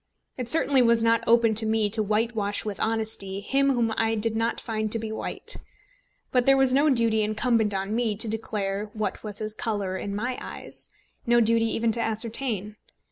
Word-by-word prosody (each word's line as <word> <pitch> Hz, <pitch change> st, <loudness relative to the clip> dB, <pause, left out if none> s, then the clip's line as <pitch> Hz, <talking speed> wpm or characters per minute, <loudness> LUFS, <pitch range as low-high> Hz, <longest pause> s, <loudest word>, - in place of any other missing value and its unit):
It 250 Hz, -2 st, -6 dB
certainly 280 Hz, -2 st, +3 dB
was 230 Hz, -1 st, +3 dB
not 230 Hz, 0 st, +2 dB
open 230 Hz, -1 st, +4 dB
to 220 Hz, +1 st, +5 dB
me 220 Hz, -1 st, +1 dB
to 220 Hz, +1 st, +6 dB
whitewash 215 Hz, -1 st, -1 dB
with 205 Hz, -3 st, -5 dB
honesty 220 Hz, -3 st, -2 dB
him 275 Hz, +6 st, +1 dB
whom 230 Hz, -2 st, 0 dB
I 225 Hz, 0 st, +1 dB
did 220 Hz, +1 st, +1 dB
not 230 Hz, +1 st, -1 dB
find 215 Hz, -1 st, -3 dB
to 230 Hz, -, +5 dB
be 220 Hz, -1 st, -5 dB
white; 220 Hz, -, -4 dB, 0.7 s
but 250 Hz, -1 st, +1 dB
there 270 Hz, 0 st, +6 dB
was 265 Hz, -1 st, +3 dB
no 285 Hz, +3 st, +3 dB
duty 230 Hz, -4 st, +2 dB
incumbent 215 Hz, +1 st, +1 dB
on 195 Hz, +2 st, -3 dB
me 230 Hz, -3 st, 0 dB
to 225 Hz, +3 st, +1 dB
declare 210 Hz, -2 st, -3 dB
what 215 Hz, -1 st, -4 dB
was 210 Hz, -2 st, -6 dB
his 215 Hz, 0 st, -3 dB
colour 205 Hz, -4 st, -3 dB
in 200 Hz, +1 st, -5 dB
my 245 Hz, +4 st, -3 dB
eyes, -, -, -9 dB, 0.4 s
no 240 Hz, 0 st, +4 dB
duty 230 Hz, 0 st, +3 dB
even 225 Hz, 0 st, 0 dB
to 230 Hz, +1 st, +2 dB
ascertain. 220 Hz, -2 st, -2 dB
225 Hz, 190 wpm, -25 LUFS, 215-235 Hz, 0.7 s, to